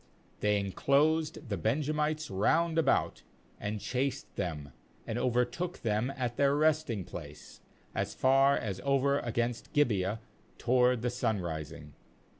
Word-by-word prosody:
^They 105 0 +2
inclosed 145 - +1
the 100 - -1
Benjamites 150 +5 -1
round 165 - +2
about, 165 - +1 0.4
and 105 +1 -3
chased 130 +4 -2
them, 75 -5 -4 0.3
and 115 - -3
overtook 125 +9 -1
them 110 +3 0
at 120 -2 -2
their 140 0 +3
resting 150 - +1
place, 75 -3 -10 0.3
as - - -2
far 135 +1 +4
as 100 -4 -4
over 140 0 +2
against 120 0 -2
Gibeah 110 -7 +1 0.4
toward 125 -1 +2
the 125 - 0
sunrising. 85 - -3
125 Hz, 120 wpm, -31 LUFS, 105-140 Hz, 0.4 s, far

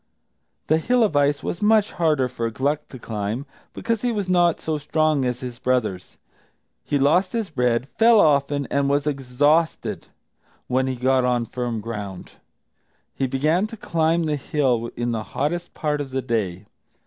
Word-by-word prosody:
The 155 +1 +2
hill 245 +8 +2
of 205 -9 0
ice 145 0 +2
was 175 - -4
much 215 0 +3
harder 155 -6 +1
for 115 -2 -3
Gluck 140 +6 -1
to 130 - -10
climb, 110 +2 -4 0.3
because 230 -2 -2
he 245 - 0
was 205 -4 -2
not 175 -2 +3
so 155 -1 -2
strong 155 -2 +1
as 125 +1 -2
his 125 -2 -7
brothers. 110 -8 -1 0.7
He 145 - 0
lost 165 +7 +2
his 225 -6 -2
bread, 125 -2 +1
fell 230 -1 +6
often, 145 -3 +3
and 140 0 +1
was 140 0 +1
exhausted 145 +3 0 0.6
when 130 +1 0
he 130 - -1
got 130 +1 +2
on 125 -1 +1
firm 120 -2 -3
ground. 105 -5 -6 0.8
He 135 - -1
began 155 +10 +1
to 225 - -10
climb 165 -2 +1
the 150 -2 0
hill 125 -5 0
in 120 0 -2
the 115 -2 -2 0.2
hottest 170 +5 -2
part 150 -2 -1
of 140 - -5
the 130 0 -3
day. 105 -5 -2
140 Hz, 170 wpm, -23 LUFS, 125-160 Hz, 0.8 s, fell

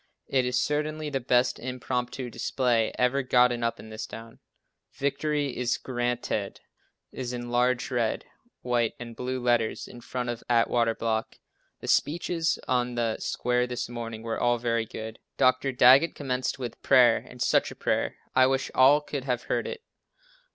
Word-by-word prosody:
It 130 -2 +1
is 125 0 +1
certainly 150 +1 -1
the 135 - 0
best 125 0 +2
impromptu 125 0 -3
display 120 -4 +1
ever 125 +2 +2
gotten 125 -2 +3
up 115 - -1
in 110 - -11
this 110 0 -6
town. 115 0 -10 0.5
"Victory 140 0 -1
is 125 -1 0
Grant 120 -1 -3
ed," 100 -2 -2 0.5
is 125 -1 -5
in 120 -1 -5
large 125 +2 +1
red, 120 -3 0 0.4
white 120 -2 0
and 120 -1 -8
blue 130 +2 -3
letters 120 -2 0
in 120 - -11
front 125 +1 -4
of 120 -1 -4
Atwater 115 -1 +2
Block. 110 -1 -2 0.5
The - - -7
speeches 165 +1 +1
on 125 -1 0
the 115 -2 -1
square 125 0 0
this 125 0 -3
morning 115 -2 -6
were 115 -1 -3
all 120 0 +2
very 115 -1 -1
good. 110 +1 -7 0.2
Dr. 130 +1 +3
Daggett 130 +5 +6
commenced 130 -2 -2
with 125 -3 -6
prayer, 125 -4 +6
and 125 - -11
such - - +2
a - - -10
prayer, - - -1 0.2
I 130 0 +6
wish 135 0 -1
all 140 +3 +6
could 140 -2 -5
have 125 -3 -1
heard - - -1
it. 470 -1 -6
125 Hz, 165 wpm, -27 LUFS, 120-130 Hz, 0.5 s, Daggett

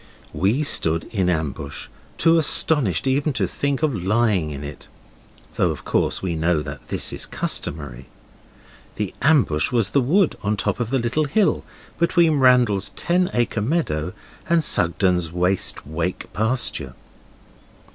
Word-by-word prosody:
We 110 +11 +1
stood 85 - +1
in 95 -5 0
ambush, 75 -4 -3 0.3
too 165 0 +4
astonished 140 - +2
even 140 +3 +1
to 105 -6 0
think 140 - -2
of 150 -3 +2
lying 100 -3 +1
in 70 -1 -7
it, 75 0 -9 0.7
though - - +1
of - - -6
course - - 0
we 90 -2 -1
know 80 -1 0
that - - -9
this - - -1
is - - -3
customary. 70 -4 -3 0.9
The 105 -3 -3
ambush 130 - +3
was 115 -5 +1
the 140 - +3
wood 165 +8 +2
on 105 +1 -1
top - - -1
of 120 -2 -2
the 135 - +1
little 120 +5 0
hill, 190 +8 +1 0.4
between 170 -3 +3
Randall's 125 -6 +3
ten 180 +1 +1
acre 120 -2 -1
meadow 105 - -1 0.4
and 170 -1 +3
Sugden's 90 - +2
Waste 90 +2 -1
Wake 80 +4 -4
pasture. 110 - -1
105 Hz, 145 wpm, -22 LUFS, 85-140 Hz, 0.9 s, too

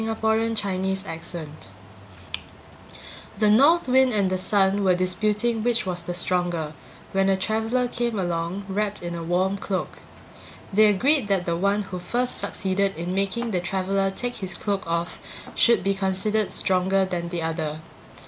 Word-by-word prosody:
Orthographic 205 -5 -1
version 155 -4 -7 1.8
The 210 0 +4
North 285 +9 +5
Wind 260 0 +4
and 200 -3 +1
the 185 - +1
Sun 195 +1 +2
were 185 -2 +4
disputing 210 +5 +1
which 235 -3 +1
was 180 -1 -2
the 175 +1 -5
stronger, 175 -3 0 0.4
when 195 0 +2
a 190 - +3
traveler 225 +5 0
came 240 -2 -1
along 175 +1 -2
wrapped 205 0 -2
in 175 0 -4
a 170 - -4
warm 185 +4 0
cloak. 190 -2 -3 0.7
They 215 +2 +6
agreed 255 +5 +3
that 195 -3 +1
the 170 - 0
one 200 +4 +1
who 185 -2 -6
first 245 +8 -1
succeeded 195 +1 -1
in 170 +2 -3
making 200 +5 -1
the 180 -3 0
traveler 195 +2 0
take 245 +5 -4
his 190 -4 -4
cloak 200 0 -2
off 170 +1 -2 0.3
should 235 -1 +4
be 195 - +2
considered 195 +2 0
stronger 190 +1 +2
than 175 -2 -3
the 170 -2 -3
other. 160 -1 -3
195 Hz, 155 wpm, -24 LUFS, 180-215 Hz, 1.8 s, They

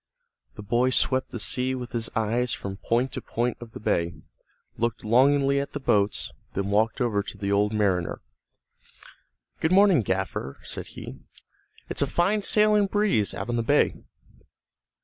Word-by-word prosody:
The 105 - -8
boy 120 +5 +2
swept 130 0 +1
the 120 - -6
sea 130 +4 -1
with 125 -1 -6
his 115 -1 -3
eyes 115 +2 0
from 95 -1 -5
point 120 +5 0
to - - -5
point 120 +1 -2
of 115 -2 -10
the - - -8
bay, 85 -5 0 0.6
looked 115 -1 -2
longingly 140 +4 +4
at 140 - -4
the 145 - -3
boats, 105 -6 +1 0.2
then 100 +1 -1
walked 110 +3 +2
over 115 -5 +1
to 100 - -9
the 100 -1 -2
old 105 +1 +2
mariner. 100 -5 0 1.4
"Good 160 - 0
morning, 190 -6 +6
gaffer," 95 -8 -3
said - - -5
he. - - -8 0.7
"It's - - -3
a 140 - +2
fine 190 +8 +1
sailing 210 0 +3
breeze 195 - +1
out 100 +4 -5
on 120 - 0
the - - +1
bay." 115 - +3
120 Hz, 165 wpm, -26 LUFS, 105-140 Hz, 1.4 s, morning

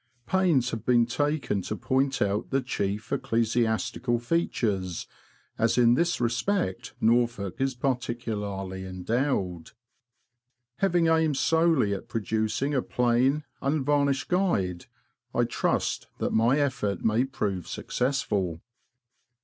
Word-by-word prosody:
Pains 170 -10 +2
have 115 - -4
been 120 -2 +4
taken 145 -4 -1
to 105 - -4
point 130 +3 +1
out 100 +1 -1
the 135 -1 0
chief 105 -2 -3
ecclesiastical 120 -2 0
features, 110 - -1 0.5
as 115 +1 +2
in 120 -1 +6
this 170 +7 +1
respect 125 - -1
Norfolk 115 -3 +1
is 135 -1 0
peculiarly 110 -7 -3
endowed. 95 - -2 1.0
Having 175 -4 +2
aimed 160 -3 +3
solely 160 -11 +3
at 95 - -6
producing 110 +5 -1
a 130 - +2
plain, 125 +5 +1 0.2
unvarnished 140 -1 +1
guide, 100 - 0 0.5
I - - +3
trust - - -1
that - - -2
my 115 +5 +3
effort 125 -9 -1
may 110 +2 +3
prove 100 -9 -3
successful. 100 - -1
120 Hz, 110 wpm, -27 LUFS, 105-140 Hz, 1.0 s, in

